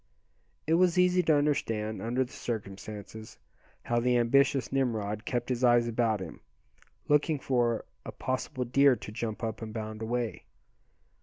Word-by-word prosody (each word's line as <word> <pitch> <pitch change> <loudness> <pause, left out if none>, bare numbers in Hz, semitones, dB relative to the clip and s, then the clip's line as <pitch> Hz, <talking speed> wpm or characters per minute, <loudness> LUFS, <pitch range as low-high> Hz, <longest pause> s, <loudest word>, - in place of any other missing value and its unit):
It 160 - +1
was 180 +1 +3
easy 180 0 +4
to 160 -3 +3
understand, 115 -7 0
under 120 +3 0
the 125 - -11
circumstances, 110 0 -7 0.5
how 120 0 +1
the 125 +1 +2
ambitious 135 +3 +3
Nimrod 110 -5 -1
kept 120 -1 -2
his 125 0 -1
eyes 120 -1 +5
about 115 -3 0
him, - - -8 0.7
looking 150 +1 +3
for 120 -4 0 0.2
a - - -7
possible 130 0 -3
deer 140 +2 +5
to 105 - -9
jump 110 +1 -4
up 110 0 -3
and 110 -1 -6
bound 110 -1 -6
away. 120 0 -3
120 Hz, 150 wpm, -29 LUFS, 110-135 Hz, 0.7 s, eyes